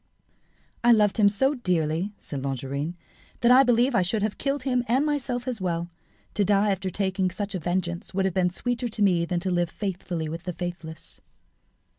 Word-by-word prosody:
"I 240 Hz, -, +6 dB
loved 210 Hz, -3 st, +3 dB
him 205 Hz, -2 st, +6 dB
so 265 Hz, +8 st, +2 dB
dearly," 180 Hz, -, 0 dB
said 140 Hz, -3 st, -6 dB
Longarine, 140 Hz, +4 st, -3 dB, 0.5 s
"that 235 Hz, -, +5 dB
I 255 Hz, +2 st, +8 dB
believe 245 Hz, 0 st, +3 dB
I 190 Hz, -, +4 dB
should 200 Hz, +4 st, 0 dB
have 215 Hz, -1 st, -2 dB
killed 275 Hz, -1 st, -1 dB
him, 250 Hz, -2 st, +1 dB
and 260 Hz, +6 st, +2 dB
myself 265 Hz, -4 st, -2 dB
as 240 Hz, -5 st, -2 dB
well. 170 Hz, -1 st, -2 dB, 0.4 s
To 205 Hz, -, +2 dB
die 205 Hz, +1 st, +3 dB
after 190 Hz, 0 st, -2 dB
taking 190 Hz, 0 st, 0 dB
such 200 Hz, +3 st, -4 dB
a 185 Hz, -, -2 dB
vengeance 175 Hz, 0 st, -2 dB
would 190 Hz, 0 st, 0 dB
have 190 Hz, -, 0 dB
been 180 Hz, -1 st, +2 dB
sweeter 245 Hz, +6 st, -2 dB
to 220 Hz, -2 st, -1 dB
me 175 Hz, -4 st, +3 dB
than 175 Hz, 0 st, -1 dB
to 185 Hz, +1 st, -1 dB
live 175 Hz, -1 st, +1 dB
faithfully 180 Hz, -4 st, -4 dB
with 165 Hz, +2 st, -6 dB
the 180 Hz, -, -3 dB
faithless." 170 Hz, -3 st, -7 dB
190 Hz, 195 wpm, -26 LUFS, 175-235 Hz, 0.5 s, I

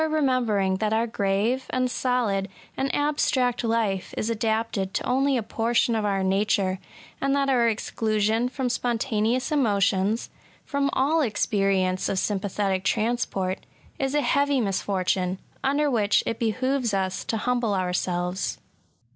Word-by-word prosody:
remembering 240 Hz, -11 st, +1 dB
that 215 Hz, +2 st, 0 dB
bur 220 Hz, +2 st, +1 dB
grave^ 210 Hz, +3 st, 0 dB
and 255 Hz, 0 st, +1 dB
solid^ 240 Hz, -7 st, 0 dB, 0.3 s
and 270 Hz, +1 st, -1 dB
abstract 270 Hz, -4 st, +1 dB
life 225 Hz, -5 st, -1 dB
is 220 Hz, -, -1 dB
adapted 220 Hz, -3 st, -1 dB
to -, -, -1 dB
only 270 Hz, +1 st, +2 dB
a 230 Hz, -, -1 dB
portion 235 Hz, +2 st, +1 dB
of 220 Hz, -1 st, 0 dB
our 195 Hz, -2 st, 0 dB
nature, 190 Hz, -1 st, +1 dB, 0.4 s
and 275 Hz, 0 st, +2 dB
that 275 Hz, -1 st, +1 dB
our 240 Hz, -3 st, +4 dB
exclusion 220 Hz, +1 st, 0 dB
from 260 Hz, 0 st, -2 dB
spontaneous 240 Hz, 0 st, 0 dB
emotions/ 205 Hz, -5 st, +1 dB, 0.2 s
— -, -, -31 dB
^from 280 Hz, -1 st, 0 dB
all 305 Hz, +5 st, +2 dB
experience 195 Hz, -6 st, +1 dB
of 195 Hz, -, -1 dB
sympathetic 195 Hz, -1 st, -1 dB
transport, 215 Hz, -4 st, 0 dB, 0.2 s
— -, -, -29 dB
is 270 Hz, +1 st, -1 dB
a 295 Hz, -, +3 dB
heavy 280 Hz, -1 st, +2 dB
misfortune, 190 Hz, -3 st, 0 dB, 0.3 s
under 285 Hz, +2 st, +2 dB
which 220 Hz, -6 st, +2 dB
it 230 Hz, -, -3 dB
behoves 245 Hz, 0 st, 0 dB
us 190 Hz, -1 st, -1 dB
to 225 Hz, -, -2 dB
humble 240 Hz, -2 st, 0 dB
ourselves. 180 Hz, 0 st, -1 dB
225 Hz, 140 wpm, -25 LUFS, 195-255 Hz, 0.4 s, our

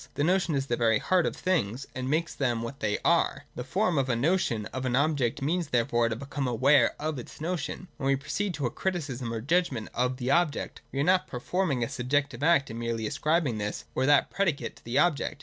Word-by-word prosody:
The 145 Hz, -, 0 dB
notion 180 Hz, -1 st, +2 dB
is 135 Hz, -1 st, 0 dB
the 120 Hz, -, 0 dB
very 115 Hz, -2 st, +3 dB
heart 180 Hz, +8 st, +2 dB
of -, -, -3 dB
things, 135 Hz, -, -1 dB
and 130 Hz, 0 st, -4 dB
makes 160 Hz, +4 st, 0 dB
them 120 Hz, -4 st, -1 dB
what 135 Hz, +4 st, -6 dB
they 105 Hz, -3 st, 0 dB
are. -, -, +2 dB
To 125 Hz, -, -4 dB
form 180 Hz, -, +1 dB
a 130 Hz, -3 st, +1 dB
notion 125 Hz, -, +1 dB
of 130 Hz, +1 st, -3 dB
an 125 Hz, -1 st, 0 dB
object 140 Hz, -3 st, +1 dB
means 170 Hz, +3 st, 0 dB
therefore 120 Hz, -2 st, +1 dB
to 110 Hz, -, -2 dB
become 140 Hz, +2 st, -4 dB
aware 130 Hz, +5 st, +4 dB
of 155 Hz, -2 st, -2 dB
its 120 Hz, -, -10 dB
notion: 170 Hz, +2 st, -3 dB
and 185 Hz, -, -13 dB
when 135 Hz, -3 st, -2 dB
we 140 Hz, -, +4 dB
proceed 155 Hz, +7 st, -3 dB
to 140 Hz, -2 st, -2 dB
a 120 Hz, -, -1 dB
criticism 140 Hz, -10 st, -3 dB
or 115 Hz, -1 st, -3 dB
judgment 140 Hz, -5 st, 0 dB
of 125 Hz, +1 st, 0 dB
the 125 Hz, 0 st, -1 dB
object, 170 Hz, -1 st, 0 dB
we 135 Hz, -, -3 dB
are -, -, +3 dB
not 185 Hz, +3 st, +3 dB
performing 140 Hz, +1 st, -1 dB
a -, -, -1 dB
subjective 140 Hz, 0 st, -1 dB
act, 145 Hz, -5 st, +3 dB
and 115 Hz, -, -6 dB
merely 115 Hz, -1 st, -2 dB
ascribing 150 Hz, -1 st, 0 dB
this 105 Hz, 0 st, -4 dB
or 130 Hz, -, +1 dB
that 145 Hz, -1 st, +4 dB
predicate 175 Hz, -8 st, -1 dB
to -, -, -20 dB
the 120 Hz, +3 st, -1 dB
object. 150 Hz, -2 st, +1 dB
140 Hz, 225 wpm, -28 LUFS, 120-160 Hz, -, aware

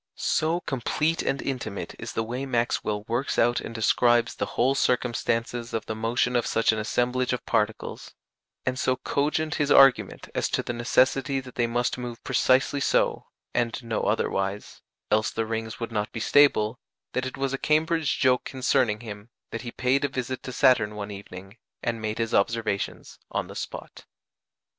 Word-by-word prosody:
So 165 Hz, +3 st, 0 dB
complete 150 Hz, +4 st, 0 dB
and 135 Hz, -, -1 dB
intimate 120 Hz, -7 st, -4 dB
is -, -, -6 dB
the 115 Hz, -, 0 dB
way 125 Hz, +4 st, -4 dB
Maxwell 115 Hz, -4 st, 0 dB
works 120 Hz, +5 st, -2 dB
out 120 Hz, +1 st, +3 dB
and 115 Hz, -, -7 dB
describes 120 Hz, +1 st, +3 dB
the -, -, -3 dB
whole 130 Hz, +3 st, +4 dB
circumstances 120 Hz, -2 st, 0 dB
of 110 Hz, -, -2 dB
the -, -, -3 dB
motion 115 Hz, +3 st, 0 dB
of 120 Hz, -, +1 dB
such 115 Hz, -, +3 dB
an 110 Hz, -, -2 dB
assemblage 125 Hz, +3 st, 0 dB
of 125 Hz, -, -4 dB
particles, 105 Hz, 0 st, -2 dB, 0.5 s
and 130 Hz, 0 st, -1 dB
so 130 Hz, -, +2 dB
cogent 150 Hz, +4 st, -1 dB
his 145 Hz, -, +1 dB
argument 135 Hz, -3 st, +5 dB
as -, -, 0 dB
to -, -, 0 dB
the 120 Hz, -, -3 dB
necessity 130 Hz, +3 st, +2 dB
that 130 Hz, -1 st, -12 dB
they 120 Hz, -1 st, +1 dB
must 120 Hz, +1 st, -1 dB
move 120 Hz, -2 st, -6 dB
precisely 130 Hz, +2 st, +2 dB
so, -, -, +1 dB, 0.3 s
and 120 Hz, +2 st, -1 dB
no 115 Hz, -2 st, -2 dB
otherwise, 95 Hz, +1 st, -1 dB, 0.3 s
else 110 Hz, 0 st, +3 dB
the 115 Hz, -, -2 dB
rings 110 Hz, 0 st, -4 dB
would 115 Hz, -1 st, -4 dB
not 105 Hz, -1 st, -2 dB
be 115 Hz, -, -5 dB
stable, 115 Hz, -2 st, +4 dB, 0.3 s
that 130 Hz, 0 st, -1 dB
it 130 Hz, -, -7 dB
was 135 Hz, 0 st, -1 dB
a 135 Hz, -, -2 dB
Cambridge 160 Hz, 0 st, +1 dB
joke 125 Hz, -1 st, +3 dB
concerning 125 Hz, -4 st, +1 dB
him 105 Hz, -1 st, -9 dB, 0.2 s
that 115 Hz, -, -4 dB
he 120 Hz, -, -6 dB
paid 130 Hz, +3 st, +1 dB
a -, -, +3 dB
visit 130 Hz, -1 st, -4 dB
to 130 Hz, -, -6 dB
Saturn 125 Hz, -6 st, +3 dB
one 105 Hz, 0 st, -5 dB
evening, 100 Hz, +1 st, -10 dB, 0.3 s
and 115 Hz, -1 st, -2 dB
made 110 Hz, 0 st, -3 dB
his 115 Hz, -1 st, -2 dB
observations 110 Hz, -1 st, -1 dB
on -, -, -2 dB
the -, -, -11 dB
spot. -, -, -7 dB
120 Hz, 175 wpm, -26 LUFS, 110-130 Hz, 0.5 s, argument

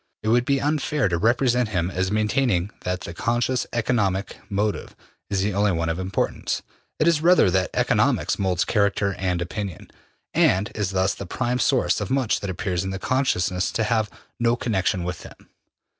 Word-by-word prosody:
It 110 Hz, -, 0 dB
would 120 Hz, +2 st, +3 dB
be 140 Hz, 0 st, +2 dB
unfair 150 Hz, -2 st, 0 dB
to 85 Hz, -, 0 dB
represent 120 Hz, +2 st, +2 dB
him 90 Hz, -3 st, -1 dB
as 95 Hz, 0 st, -1 dB
maintaining 105 Hz, -3 st, +1 dB
that 90 Hz, 0 st, -2 dB
the 85 Hz, -, -7 dB
conscious 120 Hz, +6 st, 0 dB
economic 105 Hz, -5 st, 0 dB
motive 105 Hz, +1 st, -2 dB, 0.3 s
is 95 Hz, -2 st, 0 dB
the 105 Hz, 0 st, 0 dB
only 100 Hz, 0 st, +2 dB
one 85 Hz, 0 st, -1 dB
of 80 Hz, +2 st, -2 dB
importance; 95 Hz, +1 st, -2 dB, 0.3 s
it 155 Hz, -, +2 dB
is 165 Hz, -3 st, +3 dB
rather 175 Hz, -, +5 dB
that 95 Hz, 0 st, +1 dB
economics -, -, +2 dB
molds 90 Hz, -3 st, +1 dB
character 100 Hz, -2 st, +1 dB
and 90 Hz, -2 st, 0 dB
opinion, 95 Hz, 0 st, -6 dB, 0.4 s
and 95 Hz, +4 st, +3 dB
is 105 Hz, -4 st, -1 dB
thus 95 Hz, 0 st, +1 dB
the 100 Hz, -, -8 dB
prime 125 Hz, +7 st, -1 dB
source 105 Hz, -, +2 dB
of -, -, -3 dB
much 130 Hz, -4 st, +1 dB
that 100 Hz, -, -5 dB
appears 90 Hz, 0 st, -2 dB
in 95 Hz, 0 st, -3 dB
consciousness 95 Hz, -7 st, 0 dB
to 115 Hz, -, 0 dB
have 110 Hz, -1 st, +1 dB, 0.3 s
no 120 Hz, 0 st, +3 dB
connection 95 Hz, -6 st, 0 dB
with 90 Hz, -1 st, -4 dB
them. -, -, -14 dB
100 Hz, 175 wpm, -24 LUFS, 95-120 Hz, 0.4 s, rather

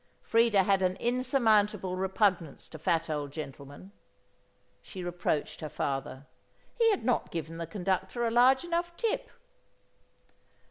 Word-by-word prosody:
Freda 230 Hz, -4 st, +4 dB
had 195 Hz, -1 st, +3 dB
an 185 Hz, 0 st, +1 dB
insurmountable 220 Hz, -6 st, +1 dB
repugnance 190 Hz, -4 st, 0 dB
to 155 Hz, -, -11 dB
fat 165 Hz, +2 st, +1 dB
old 145 Hz, -3 st, -3 dB
gentlemen. 145 Hz, +4 st, -9 dB, 0.9 s
She 185 Hz, -3 st, -8 dB
reproached 175 Hz, -4 st, -2 dB
her 155 Hz, -, -4 dB
father; 135 Hz, -1 st, -3 dB, 0.5 s
he 460 Hz, -1 st, +5 dB
had 405 Hz, -, 0 dB
not 245 Hz, -1 st, +1 dB
given 165 Hz, 0 st, -5 dB
the 165 Hz, -, -4 dB
conductor 190 Hz, +5 st, -2 dB
a 230 Hz, -, 0 dB
large 255 Hz, +4 st, +5 dB
enough 345 Hz, 0 st, -2 dB
tip. 455 Hz, -2 st, -1 dB
190 Hz, 130 wpm, -29 LUFS, 160-235 Hz, 0.9 s, he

